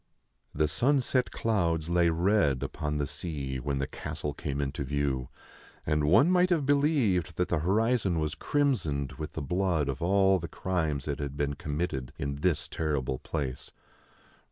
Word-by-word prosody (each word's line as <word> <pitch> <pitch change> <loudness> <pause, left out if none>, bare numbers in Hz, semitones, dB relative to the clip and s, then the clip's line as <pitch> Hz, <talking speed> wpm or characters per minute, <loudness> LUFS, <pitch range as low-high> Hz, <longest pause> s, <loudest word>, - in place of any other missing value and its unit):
The 75 +1 +2
sunset 130 - +2
clouds 85 -8 0
lay 85 0 +3
red 85 -5 +2
upon 75 -1 -3
the 75 - 0
sea 70 -4 -4
when 70 +2 -2
the 70 - 0
castle 75 +1 -5
came 70 -1 -4
into 70 0 -2
view, 70 -2 -1 0.6
and 75 -1 +1
one 120 - +5
might 180 0 +4
have 165 -6 +2
believed 135 - +2
that 90 - 0
the 85 - +1
horizon 100 +1 +2
was 75 -1 -1
crimsoned 100 - 0
with 75 - -5
the 80 - -4
blood 85 -1 0
of 70 +2 -3
all 95 +1 +4
the 85 - -5
crimes 80 -5 -2
that 70 -2 -3
had 70 -1 -4
been 70 -1 0
committed 70 -3 -3
in 70 0 -3
this 85 0 0
terrible 70 -5 -2
place. 70 -5 -4
80 Hz, 160 wpm, -29 LUFS, 70-95 Hz, 0.6 s, one